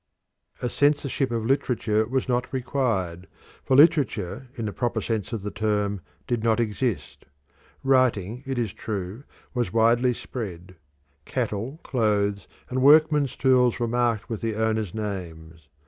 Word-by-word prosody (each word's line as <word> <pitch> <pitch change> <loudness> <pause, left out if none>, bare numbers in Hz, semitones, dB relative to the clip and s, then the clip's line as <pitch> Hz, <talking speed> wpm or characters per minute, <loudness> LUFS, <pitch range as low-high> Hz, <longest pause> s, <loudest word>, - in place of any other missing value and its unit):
A - - +1
censorship 145 0 +1
of 115 -2 -2
literature 115 -5 +1
was 130 +2 -1
not 125 -1 -1
required, 115 -10 -1 0.4
for 130 - +2
literature 140 - +3
in 115 -4 -4
the 105 - -3
proper 120 -2 -1
sense 110 -3 -3
of 110 -4 -4
the 105 - -4
term 105 -1 -1 0.2
did 120 -2 -1
not 115 0 +2
exist. 115 0 -2 0.6
Writing, 125 -4 +2
it 135 -1 -2
is 115 -4 -1
true, 105 +4 -5 0.3
was 120 -8 -1
widely 115 +2 +3
spread. 90 -9 -7 0.5
Cattle, 125 +3 -3
clothes, 105 -4 0 0.2
and 130 +1 -2
workmen's 150 -1 +5
tools 125 -3 +3
were 120 - 0
marked 120 -2 0
with 115 -3 -5
the 115 -2 -2
owners' 110 -3 -1
names. 85 -7 -6
115 Hz, 140 wpm, -25 LUFS, 105-130 Hz, 0.6 s, workmen's